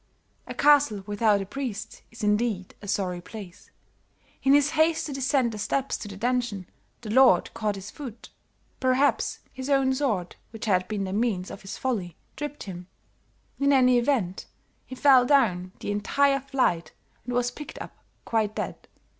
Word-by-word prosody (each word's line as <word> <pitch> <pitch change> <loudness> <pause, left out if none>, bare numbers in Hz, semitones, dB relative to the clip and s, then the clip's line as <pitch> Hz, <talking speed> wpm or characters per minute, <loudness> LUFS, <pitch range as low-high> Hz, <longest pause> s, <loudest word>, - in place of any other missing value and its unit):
A - - -6
castle 280 -9 +4
without 205 0 +2
a - - -4
priest 220 -2 -5
is 230 0 -10
indeed 210 -2 0
a 205 - -9
sorry 180 -3 -1
place; 200 -1 -11 0.7
in 275 +1 +5
his 290 +1 +3
haste 320 +1 +2
to 290 - -5
descend 265 -2 +1
the 215 - -7
steps 270 +6 -1
to 210 - -7
the 200 -1 -8
dungeon 240 -4 -1 0.4
the 215 -3 -6
lord 260 +3 +5
caught 215 -3 -1
his 195 +1 -8
foot; 240 -6 -9 0.5
perhaps 260 +2 +1
his 260 +1 -6
own 270 -1 +3
sword, 220 -11 -1
which 225 0 -7
had 185 -4 +2
been 210 -2 -2
the 190 0 -4
means 205 -4 -1
of 195 - -9
his 195 - -7
folly, 200 -10 -2 0.2
tripped 295 +1 -5
him; 180 -3 -8 0.7
in 280 0 +3
any 255 -2 +5
event, 235 -8 -1 0.4
he 260 - -7
fell 265 -2 +6
down 215 -10 +2
the - - -3
entire 275 +7 +2
flight 255 - 0 0.3
and 245 0 -4
was 245 0 +1
picked 295 +4 -9
up - - -8 0.3
quite 215 -2 0
dead." - - -5
235 Hz, 170 wpm, -26 LUFS, 200-270 Hz, 0.7 s, fell